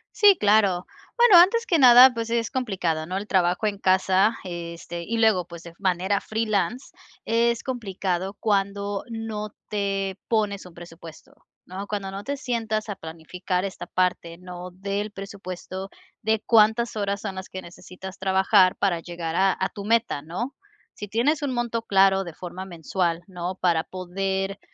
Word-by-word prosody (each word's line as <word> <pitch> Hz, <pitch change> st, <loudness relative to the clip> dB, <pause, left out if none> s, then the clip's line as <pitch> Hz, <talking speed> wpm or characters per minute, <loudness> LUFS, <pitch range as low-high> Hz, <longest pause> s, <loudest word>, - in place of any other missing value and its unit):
Sí, 410 Hz, -2 st, +7 dB
claro. 205 Hz, -4 st, +3 dB, 0.3 s
Bueno, 475 Hz, -7 st, +8 dB
antes 465 Hz, +6 st, +3 dB
que 340 Hz, -, +2 dB
nada, 250 Hz, 0 st, +9 dB
pues, 230 Hz, -1 st, -4 dB
es 230 Hz, -2 st, 0 dB
complicado, 185 Hz, -11 st, -1 dB
¿no?, 185 Hz, +3 st, -3 dB
el 205 Hz, +2 st, -5 dB
trabajo 180 Hz, +2 st, +1 dB
en 200 Hz, -1 st, -2 dB
casa, 190 Hz, +3 st, +3 dB
este 170 Hz, -1 st, -6 dB
y 230 Hz, +5 st, -3 dB
luego, 220 Hz, -6 st, +3 dB
pues, 170 Hz, 0 st, -11 dB
de 170 Hz, -, -10 dB
f 170 Hz, -, -26 dB
manera 190 Hz, +1 st, 0 dB
freelance, 220 Hz, +2 st, -1 dB, 0.4 s
es 235 Hz, +1 st, +1 dB
complicado 195 Hz, -6 st, -3 dB
cuando 200 Hz, -1 st, -1 dB
no 220 Hz, -2 st, -5 dB, 0.2 s
te 195 Hz, -2 st, -2 dB
pones 210 Hz, -4 st, 0 dB
un 180 Hz, -, -13 dB
presupuesto, 165 Hz, -1 st, -12 dB, 0.3 s
¿no?, 195 Hz, +2 st, -7 dB
cuando 200 Hz, -2 st, -4 dB
no 195 Hz, +1 st, -6 dB
te 280 Hz, +3 st, -3 dB
sientas 225 Hz, -5 st, -2 dB
a 205 Hz, -, -3 dB
planificar 180 Hz, +3 st, -4 dB
esta 195 Hz, -, -6 dB
parte, 175 Hz, -2 st, -1 dB
¿no?, 180 Hz, 0 st, -8 dB
del 200 Hz, +3 st, -4 dB
presupuesto, 195 Hz, -1 st, -7 dB, 0.3 s
de 220 Hz, 0 st, +1 dB
cuántas 225 Hz, +1 st, +4 dB
horas 200 Hz, -1 st, -2 dB
son 200 Hz, -3 st, -5 dB
las 190 Hz, 0 st, -7 dB
que 185 Hz, -, -7 dB
necesitas 185 Hz, +2 st, -11 dB
trabajar 190 Hz, 0 st, +4 dB
para 180 Hz, -4 st, 0 dB
llegar 170 Hz, -1 st, -5 dB
a 190 Hz, +1 st, +3 dB
a 190 Hz, -, 0 dB
tu 200 Hz, -, -8 dB
meta, 230 Hz, -9 st, +1 dB
¿no?, 185 Hz, -, -5 dB, 0.4 s
si 205 Hz, -, -7 dB
tienes 250 Hz, +9 st, +1 dB
un 270 Hz, -, -1 dB
monto 240 Hz, -1 st, -1 dB
claro 195 Hz, -2 st, +4 dB
de 170 Hz, -, -8 dB
forma 185 Hz, +1 st, -7 dB
mensual, 170 Hz, 0 st, -2 dB
¿no?, 180 Hz, 0 st, -5 dB
para 170 Hz, -4 st, +1 dB
poder, 195 Hz, +2 st, -3 dB
195 Hz, 165 wpm, -24 LUFS, 180-220 Hz, 0.4 s, nada